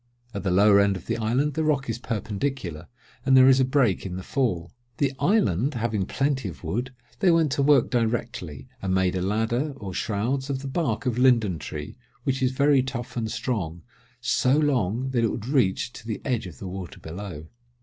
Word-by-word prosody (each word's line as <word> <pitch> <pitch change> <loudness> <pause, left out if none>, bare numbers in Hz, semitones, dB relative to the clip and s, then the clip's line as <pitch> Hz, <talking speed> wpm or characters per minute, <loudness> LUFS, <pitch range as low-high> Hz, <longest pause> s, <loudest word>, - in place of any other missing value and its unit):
At 100 - -3
the 95 - -1
lower 100 +2 +6
end 100 -1 +3
of 90 - -12
the - - -1
island 125 +7 0
the 160 - -1
rock 145 -3 +1
is 115 0 -3
perpendicular, 105 - -3 0.4
and 135 -1 +5
there 130 0 +8
is 135 0 +6
a - - +5
break 130 -6 +2
in 90 -2 -5
the 95 - -6
fall. 90 - -1 0.3
The 140 -2 +1
island 140 - +2
having 110 -4 -1
plenty 135 -6 0
of 85 - -11
wood, 120 +11 -2 0.3
they 185 - +4
went 165 -4 +3
to 140 - +1
work 140 0 +4
directly 115 - -2
and 95 -1 0
made 95 -1 +2
a 90 - -1
ladder, 115 +9 0
or 100 -6 -6
shrouds, 120 +9 -1
of 135 0 -2
the - - -4
bark 135 -6 -1
of 125 -1 0
linden 115 -9 +3
tree, 75 - -7 0.2
which 135 0 -1
is 130 -1 +2
very 140 +1 +4
tough 125 -2 -5
and 110 -2 -2
strong, 100 -9 -3 0.4
so 125 +2 +2
long, 130 -5 +1
that 120 -3 +1
it 115 - +3
would 110 - -4
reach 125 -3 +1
to 110 - -11
the 110 - -3
edge 120 -7 -1
of 80 -7 -11
the 95 - -7
water 90 -2 -7
below. 85 -2 -7
120 Hz, 205 wpm, -25 LUFS, 95-135 Hz, 0.4 s, there